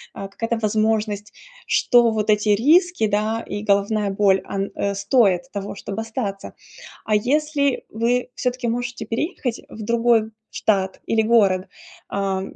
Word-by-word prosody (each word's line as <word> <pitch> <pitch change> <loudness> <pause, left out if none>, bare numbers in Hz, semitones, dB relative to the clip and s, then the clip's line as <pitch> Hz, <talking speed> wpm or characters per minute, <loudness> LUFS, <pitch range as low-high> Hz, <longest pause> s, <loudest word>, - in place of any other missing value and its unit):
А, 195 - -6
какая-то 230 +4 -3
возможность, 215 -1 0 0.3
что 240 -2 +4
вот 215 -1 +1
эти 210 0 +1
риски, 305 - +4
да, 215 +2 0
и 205 +1 -4
головная 205 0 +1
боль, 195 -1 +3
ан 195 0 -3
э, 200 0 -1
стоит 200 0 +2
того, 200 -2 -5
чтобы 200 +2 -6
остаться. 220 -3 -5 0.5
А 215 - -1
если 280 +5 +1
вы, 240 +3 0
всё-таки, 250 -1 -2
можете 240 +1 -3
переехать 250 - -3
в 220 - -10
другой 230 0 +2 0.2
штат 190 -3 -1
или 225 - +2
город, 200 -5 +3 0.4
а, 195 -1 -1
220 Hz, 140 wpm, -22 LUFS, 200-235 Hz, 0.5 s, что